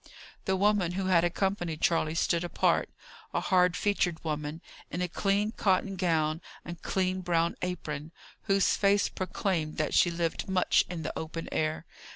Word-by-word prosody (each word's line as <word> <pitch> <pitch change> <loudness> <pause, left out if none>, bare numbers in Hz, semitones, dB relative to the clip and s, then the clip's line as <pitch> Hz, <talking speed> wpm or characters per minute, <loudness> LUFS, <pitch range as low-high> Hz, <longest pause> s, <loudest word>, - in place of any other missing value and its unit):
The 190 - +1
woman 195 -3 +2
who 190 +1 -2
had 180 -3 +4
accompanied 175 -2 -1
Charley 165 -2 +2
stood 170 0 +1
apart 175 - +1 0.5
a - - +3
hard 180 -1 +3
featured 180 -5 0
woman, 150 0 -3 0.3
in 175 - -4
a 180 - 0
clean 200 +4 0
cotton 195 -2 +1
gown, 160 -3 +1 0.2
and 170 0 -7
clean 185 -1 0
brown 170 -1 +1
apron, 160 -4 -4 0.3
whose 195 -1 +3
face 200 0 +3
proclaimed 185 -4 -2
that 155 -2 -1
she 175 - +5
lived 170 +1 -2
much 185 -1 +3
in 170 -2 -5
the 155 - -3
open 165 +1 -5
air. 155 +1 -1
175 Hz, 160 wpm, -29 LUFS, 160-190 Hz, 0.5 s, she